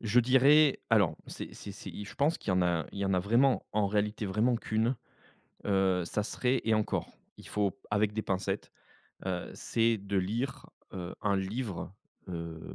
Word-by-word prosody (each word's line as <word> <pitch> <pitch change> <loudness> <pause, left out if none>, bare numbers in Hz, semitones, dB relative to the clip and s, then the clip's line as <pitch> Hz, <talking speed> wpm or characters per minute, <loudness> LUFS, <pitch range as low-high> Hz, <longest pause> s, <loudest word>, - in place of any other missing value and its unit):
je 115 +2 +4
dirais 135 +4 +5
alors, 105 -7 +4
c'est - - -7
c'est - - -8
c'est - - -8
il 105 - -7
je - - -10
pense 145 +4 +2
qu'il - - -10
y - - +4
en 90 0 +3
a 85 -2 +1
qu'il - - -10
y 100 - 0
en 95 -1 +2
a - - +3
vraiment, 120 +8 +3
en 105 -1 +2
réalité, 105 +1 0
vraiment 110 +6 +2
qu'une, 115 +2 0 0.7
heu, 95 -2 +2
ça 105 +5 -1
serait 125 +3 0
et 110 -1 +3
encore 110 -1 -1 0.3
il - - -12
faut 100 -2 0
avec 105 0 +2
des 110 - -1
pincettes, 95 +1 -2 0.5
heu, 90 -2 -2
c'est 115 0 +1
de 100 0 -3
lire, 115 +9 -2 0.3
heu, 90 -1 -5
un 100 -1 +2
livre, 95 -3 -3 0.4
heu 85 -2 -5
105 Hz, 190 wpm, -31 LUFS, 95-115 Hz, 0.7 s, dirais